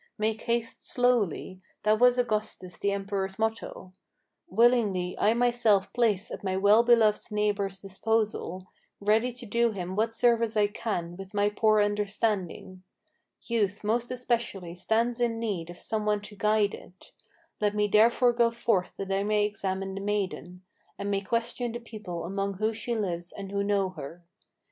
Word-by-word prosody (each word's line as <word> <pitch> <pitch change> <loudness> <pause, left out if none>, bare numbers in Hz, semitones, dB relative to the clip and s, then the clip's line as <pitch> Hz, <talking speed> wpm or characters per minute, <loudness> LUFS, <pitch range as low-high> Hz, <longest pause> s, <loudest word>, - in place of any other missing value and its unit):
Make 220 0 -1
haste 235 -1 -2
slowly: 220 - +1 0.2
that 215 0 +3
was 250 0 +5
Augustus 215 -6 -2
the 200 - +1
emperor's 195 -1 -3
motto. 220 -4 -3 0.6
Willingly 205 -4 +2
I 220 +2 +3
myself 235 -5 +2
place 220 -5 +1
at - - -7
my 190 -1 -1
well 205 +3 +6
beloved 230 -2 +3
neighbor's 200 -2 -1
disposal, 195 -2 -2 0.3
Ready 220 +4 +2
to 245 0 -8
do 235 +1 +1
him 185 -1 -5
what 220 +2 +1
service 230 -1 +2
I 210 - +5
can 175 -6 -4
with 195 +1 -10
my 205 0 +3
poor 215 0 +3
understanding. 205 -3 -2 0.6
Youth 205 -4 -1
most 230 +3 0
especially 235 -8 -2
stands 230 +6 0
in 235 -1 +1
need 200 -8 -3
of 175 - -9
some 220 +2 -2
one 210 -1 +1
to 205 0 -10
guide 210 0 +2
it. 180 - -13 0.5
Let 210 0 +1
me 210 0 +2
therefore 235 +4 +4
go 235 0 +3
forth 230 -5 0
that 195 0 -4
I 195 +1 +1
may 210 0 +2
examine 195 -2 -3
the 195 - -5
maiden, 190 -3 -3 0.3
And 200 0 -3
may 195 -1 0
question 235 +3 -2
the 240 - -4
people 210 -8 -7
among 195 +2 -2
whom 215 +3 0
she 235 +2 -3
lives 175 -5 -3
and 195 -1 -8
who 200 0 0
know 200 -2 +1
her. 175 -1 -9
210 Hz, 165 wpm, -28 LUFS, 195-230 Hz, 0.6 s, well